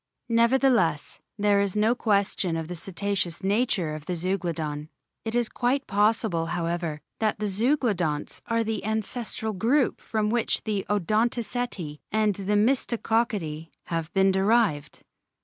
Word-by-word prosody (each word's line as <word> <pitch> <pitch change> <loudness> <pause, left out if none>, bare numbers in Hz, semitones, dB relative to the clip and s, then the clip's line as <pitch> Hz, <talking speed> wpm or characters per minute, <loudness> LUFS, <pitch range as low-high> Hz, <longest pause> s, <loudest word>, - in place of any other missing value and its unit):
Nevertheless, 230 - +2 0.2
there 205 -1 +3
is 200 0 -1
no 215 +3 +4
question 200 -6 +1
of 160 -1 -4
the 180 - -5
Cetaceous 190 0 -2
nature 195 -6 +1
of 155 -1 -7
Zeuglodon. 170 -4 -2 0.3
It 225 +1 -3
is 240 -1 +2
quite 255 +5 0
possible, 205 -4 +1
however, 170 -2 -2 0.2
that 220 -1 +1
the 210 - -2
Zeuglodonts 200 - 0
are 230 0 +1
the 220 -1 -3
ancestral 220 +1 -2
group 240 +8 +1
from 215 -1 -1
which 235 -1 0
both 205 -3 -2
Odontoceti 215 -4 -1
and 215 -1 +2
Mystacoceti 210 - 0
have 165 -1 -3
been 195 0 +5
derived. 190 -6 +1
205 Hz, 125 wpm, -26 LUFS, 170-230 Hz, 0.3 s, been